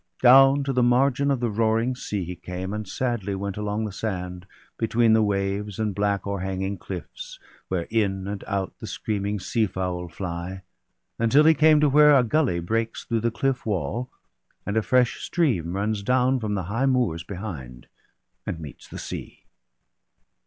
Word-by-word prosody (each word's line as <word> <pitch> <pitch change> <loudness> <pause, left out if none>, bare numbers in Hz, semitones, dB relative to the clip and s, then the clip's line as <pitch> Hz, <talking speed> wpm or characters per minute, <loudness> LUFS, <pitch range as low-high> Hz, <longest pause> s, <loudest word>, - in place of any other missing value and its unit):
Down 135 +2 +7
to 135 0 -1
the 125 - +2
margin 135 +3 +3
of 135 -3 0
the 120 -2 0
roaring 115 +3 +1
sea 105 -5 -3
He 90 +1 -6
came, 90 +2 -6
and 105 -1 -4
sadly 110 -3 -2
went 100 0 -4
along 105 +1 -2
the 105 - -4
sand, 90 -3 -5 0.3
Between 115 0 +3
the 110 - +5
waves 100 0 -1
and 110 -2 -1
black 100 0 0
o'erhanging 95 -1 -3
cliffs 90 -1 -8 0.3
Where 90 -2 -2
in 100 -4 0
and 100 -1 -5
out 100 -2 -2
the - - -7
screaming 105 -1 -2
seafowl 90 -3 -2
fly; 85 +1 -6 0.6
Until 115 +6 +5
he 160 +1 +7
came 155 0 +5
to 150 - +4
v/here 150 +1 +7
a 130 - +5
gully 125 - +1
breaks 115 +6 -2
Through 115 - -1
the 115 - +1
cliff' 135 +2 -1
wall, 110 - -2 0.6
and 100 - -2
a 110 - +3
fresh 125 +2 +2
stream 110 - 0
runs 105 +1 -1
down 130 +4 +2
From 105 -3 -2
the 95 - -2
high 115 +10 0
moors 120 -11 +1
behind, 85 - -7 0.6
and 80 - -4
meets 75 -3 -10
the - - -9
sea. - - -7
105 Hz, 170 wpm, -25 LUFS, 95-125 Hz, 0.6 s, Down